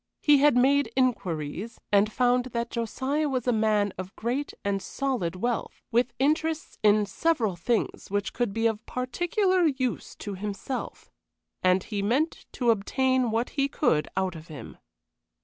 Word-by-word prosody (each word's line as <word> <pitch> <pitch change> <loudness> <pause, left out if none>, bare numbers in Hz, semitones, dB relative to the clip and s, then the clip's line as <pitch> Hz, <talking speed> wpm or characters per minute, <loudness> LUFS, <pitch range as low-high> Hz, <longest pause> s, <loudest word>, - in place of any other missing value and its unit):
He 295 -2 +6
had 285 -2 +5
made 270 -1 +3
inquiries, 205 - -1
and 205 +1 +4
found 245 +1 +2
that 235 -1 -3
Josiah 265 +6 -1
was 255 -3 -1
a 250 - +3
man 215 -2 +2
of 185 +1 -7
great 250 +6 -2
and 200 -1 0
solid 225 -7 -2
wealth, 235 +5 -3
with 240 +2 +2
interests 315 +3 0
in 210 0 +4
several 230 - 0
things 220 +7 -1
which 205 0 -1
could 240 -4 0
be 225 +3 -1
of 225 -1 +1
particular 350 - +1
use 260 -4 -2
to 205 - -6
himself, 210 +6 -5 0.5
and 185 0 +3
he 205 -2 -3
meant 260 +11 0
to 240 -3 +3
obtain 255 +4 +1
what 230 +2 0
he 275 -1 +1
could 160 - +1
out 190 -1 0
of 160 0 -10
him. 150 -4 -10
235 Hz, 155 wpm, -27 LUFS, 205-265 Hz, 0.5 s, He